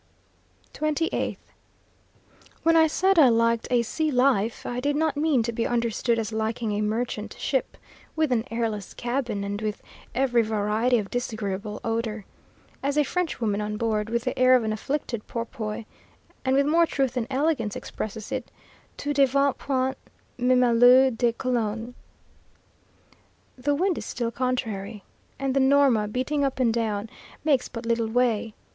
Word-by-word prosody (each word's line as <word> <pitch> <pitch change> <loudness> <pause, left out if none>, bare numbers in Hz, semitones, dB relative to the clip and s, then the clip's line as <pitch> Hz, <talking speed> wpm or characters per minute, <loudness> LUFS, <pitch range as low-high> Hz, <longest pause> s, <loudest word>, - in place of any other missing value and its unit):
28th. 310 +2 -1 1.3
When 330 0 +4
I 320 -1 +6
said 375 +3 +2
I 275 -5 +8
liked 230 0 +2
a 245 -2 +3
sea 310 +7 -1
life, 250 -5 +1
I 245 - -3
did 285 +3 0
not 310 -1 +1
mean 290 -5 +2
to 235 - -2
be 230 0 -1
understood 235 0 0
as 225 -1 -3
liking 220 0 -1
a 205 0 -1
merchant 215 0 -2
ship, 265 -2 -1 0.4
with 315 -3 +1
an 230 -3 +2
airless 225 -3 -3
cabin, 240 -4 -2
and 200 +1 -4
with 215 -1 -3 0.3
every 245 -2 +3
variety 220 +3 +1
of 205 -3 -4
disagreeable 210 -4 -3
odour. 225 -2 -2 0.6
As 280 +2 -1
a 300 - +5
French 360 +2 -2
woman 210 -3 0
on 210 0 -3
board, 215 -1 -1
with 235 0 -1
the 255 - -2
air 255 0 +6
of 250 - +2
an 215 -1 -1
afflicted 235 -1 -3
porpoise, 225 -2 -5 0.6
and 260 0 +2
with 280 +1 +4
more 330 +3 +4
truth 270 -4 0
than 245 -3 -2
elegance, 270 -6 0
expresses 215 +2 -6
it: 260 -2 -3 0.5
"Tout 290 0 -3
devient 275 0 +3
puant, 265 -1 0 0.4
même 250 -1 +3
l'eau 255 +2 +7
de 235 0 +1
cologne." 235 -1 -2 1.6
The 285 +3 0
wind 360 +2 +1
is - - -7
still 235 -2 -2
contrary, 225 -5 -3 0.3
and 270 -1 -2
the - - +4
Norma, 265 -5 +4
beating 260 +6 -1
up 270 -1 -1
and 235 -3 +3
down, 220 -2 -1 0.4
makes 280 -5 +2
but 230 -1 -7
little 230 -1 +1
way. 230 -2 +1
240 Hz, 160 wpm, -25 LUFS, 220-270 Hz, 1.6 s, I